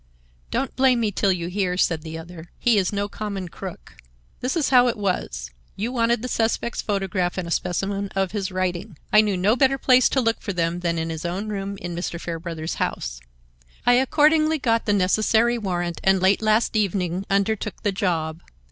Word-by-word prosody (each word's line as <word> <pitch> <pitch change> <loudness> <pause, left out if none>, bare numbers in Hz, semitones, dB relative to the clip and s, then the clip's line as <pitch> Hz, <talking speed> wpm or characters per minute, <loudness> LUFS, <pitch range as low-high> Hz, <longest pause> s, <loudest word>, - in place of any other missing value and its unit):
"Don't 265 +2 -2
blame 260 -2 +4
me 220 -3 0
till 195 0 +1
you 170 -2 -2
hear," 180 -1 -1
said 165 -3 +1
the 160 0 -7
other. 165 0 -10
"He 235 -4 +3
is 185 - 0
no 205 0 -1
common 200 -3 -5
crook. 185 +1 -9 0.4
This 255 +6 -1
is 310 - +1
how 250 -1 +6
it 235 - 0
was: 65 - -2 0.2
You 220 +5 -2
wanted 235 -2 +1
the - - -2
suspect's 235 0 -1
photograph 195 -4 -1
and 180 -2 -3
a - - -6
specimen 195 +4 -1
of 195 -1 0
his 195 -2 -3
writing. 185 0 -3 0.2
I 215 - +8
knew 205 -3 0
no 200 +5 +3
better 270 0 +3
place 255 -1 +5
to 270 - +1
look 230 -2 0
for 200 - -4
them 170 0 -1
than 170 -1 -1
in 165 0 -2
his 160 -1 -5
own 185 +5 -3
room 200 -1 -4
in 175 -2 -6
Mr. 170 0 -4
Fairbrother's 165 -1 -5
house. - - -2 0.7
I 245 - +6
accordingly 310 +5 +3
got 230 -5 0
the 205 - +3
necessary 220 +5 +2
warrant 175 -4 -3
and 190 0 +4
late 190 +3 +3
last 220 +1 +2
evening 190 -3 0
undertook 200 +1 -1
the 205 - +2
job. 170 -5 -1
195 Hz, 195 wpm, -23 LUFS, 175-225 Hz, 0.7 s, I